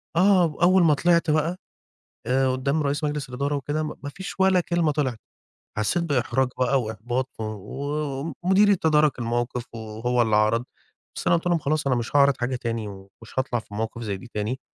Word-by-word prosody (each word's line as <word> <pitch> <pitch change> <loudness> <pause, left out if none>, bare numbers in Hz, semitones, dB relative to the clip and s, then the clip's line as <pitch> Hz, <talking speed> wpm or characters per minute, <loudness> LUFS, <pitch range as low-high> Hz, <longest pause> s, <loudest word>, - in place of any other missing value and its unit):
آه، 185 +1 +5 0.2
أوّل 185 +1 +5
ما 155 - +5
طلِعت 170 +2 +2
بقى 160 +4 +1 0.7
آآ 130 +1 +2
قُدّام 140 +4 0
رئيس 145 +2 -1
مجلس 145 -2 -2
الإدارة 140 +3 -2
وكده، 145 +3 -2
م 150 - -5
ما 145 - -4
فيش 190 +6 -8
ولا 190 -1 +4
كلمة 170 -3 +1
طلِعت. 130 -6 -1 0.6
حسيت 110 +11 +1
بإحراج 130 -3 +1
بقى 130 +1 +2
وإحباط 120 +4 -3
و 110 - -2 1.0
ومديري 195 +3 +4
تدارك 155 -4 +2
الموقِف 120 +1 -2
وهو 115 +2 -1
اللي 110 -2 +2
عرَض. 110 +3 +2 0.5
بس - - -6
أنا - - +5
قُلت 170 - -5
لهم: 175 -1 +3
"خلاص 150 0 -1
أنا 130 -2 +2
مش 120 +4 -2
هاعرض 140 0 +5
حاجة 125 +1 -1
تاني، 115 -3 -3
ومش 100 +5 -11
هاطلَع 130 -2 0
في 105 - -14
مواقِف 110 +2 -4
زَي 100 -3 -3
دي 120 - -12
تاني." 110 +5 -2
135 Hz, 185 wpm, -24 LUFS, 120-155 Hz, 1.0 s, آه